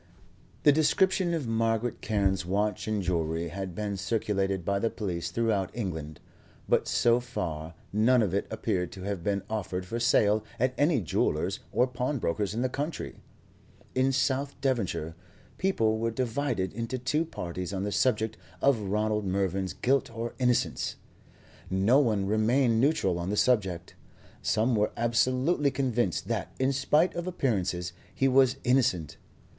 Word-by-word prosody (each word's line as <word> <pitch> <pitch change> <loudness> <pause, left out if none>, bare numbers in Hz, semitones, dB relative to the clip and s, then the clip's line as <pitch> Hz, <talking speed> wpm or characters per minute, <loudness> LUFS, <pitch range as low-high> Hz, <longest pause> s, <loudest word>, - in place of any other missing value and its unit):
The 145 - +7
description 180 +4 +2
of 150 -7 -3
Margaret 115 +1 0
Carne's 100 -3 +1
watch 100 +3 -1
and 105 -2 -1
jewellery 85 -1 -1
had 95 0 -5
been 100 -1 -3
circulated 95 -2 -1
by 100 0 +1
the 115 - +1
police 90 -8 -3
throughout 110 -5 0
England, 80 -8 -4 0.5
but - - +2
so 120 0 +3
far 85 -10 -5 0.2
none 115 +3 +4
of 95 -4 -1
it 100 - 0
appeared 90 -2 -2
to 95 - -9
have 100 -2 -3
been 100 0 0
offered 95 -4 -3
for 115 +6 -4
sale 110 -3 +3 0.2
at 125 +2 +2
any 145 -3 +2
jeweller's 85 - 0
or 125 - +3
pawnbroker's 125 - -2
in 120 - 0
the - - +2
country. 145 +4 -4 0.8
In 130 +1 +2
South 135 +1 0
Devonshire, 100 - -1 0.5
people 115 - +1
were 115 +1 0
divided 120 -5 -1
into 115 +3 -3
two 150 +6 0
parties 90 - -5
on 95 -1 -2
the 105 - -2
subject 110 0 +1 0.2
of 140 -4 +3
Ronald 105 +1 0
Mervyn's 95 0 -1
guilt 135 +2 +1
or 115 0 -5
innocence. 125 -1 +1 0.7
No 100 +8 +4
one 110 -8 +1
remained 115 +3 +2
neutral 100 - +2
on 85 +2 -3
the 105 - -1
subject. 95 -9 +1 0.5
Some 115 +3 +1
were 105 0 +1
absolutely 130 +6 +2
convinced 125 - -1
that, - - -3
in 130 +1 +1
spite 150 +6 +2
of 175 +1 -4
appearances, 95 - -1 0.2
he 135 - +2
was 130 0 +4
innocent. 125 - +1
110 Hz, 150 wpm, -28 LUFS, 95-130 Hz, 0.8 s, The